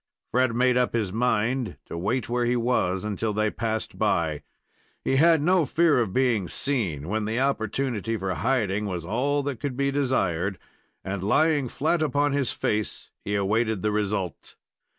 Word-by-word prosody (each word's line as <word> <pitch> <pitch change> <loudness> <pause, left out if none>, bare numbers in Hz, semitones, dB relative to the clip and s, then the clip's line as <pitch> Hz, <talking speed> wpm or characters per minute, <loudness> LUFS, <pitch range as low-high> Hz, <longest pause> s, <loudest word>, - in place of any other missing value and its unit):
Fred 125 -1 +2
made 125 +1 +3
up 125 -1 +1
his 105 -5 -1
mind 120 +1 0
to - - -7
wait 105 +8 -1
where 120 0 0
he 120 +1 +1
was 115 -6 0
until 105 +1 -2
they 110 0 +1
passed 110 -1 -3
by. 80 -3 +1 0.6
He 135 - +1
had 160 0 +5
no 180 +1 +4
fear 160 -5 +3
of 115 -6 0
being 115 -5 +1
seen, 95 - -1
when 110 +2 -1
the 110 +3 -1
opportunity 115 -3 -1
for 95 -2 -2
hiding 105 -4 0
was 90 -4 -4
all 140 +9 0
that 135 -4 -3
could 130 -1 -4
be 140 0 +1
desired, 100 - 0 0.5
and, 95 0 -4
lying 145 - +2
flat 155 +6 0
upon 145 -1 +1
his 140 -3 0
face, 105 0 -2
he 100 - -2
awaited 110 +1 0
the 105 - +1
result. 105 -5 -2
115 Hz, 170 wpm, -25 LUFS, 100-135 Hz, 0.6 s, had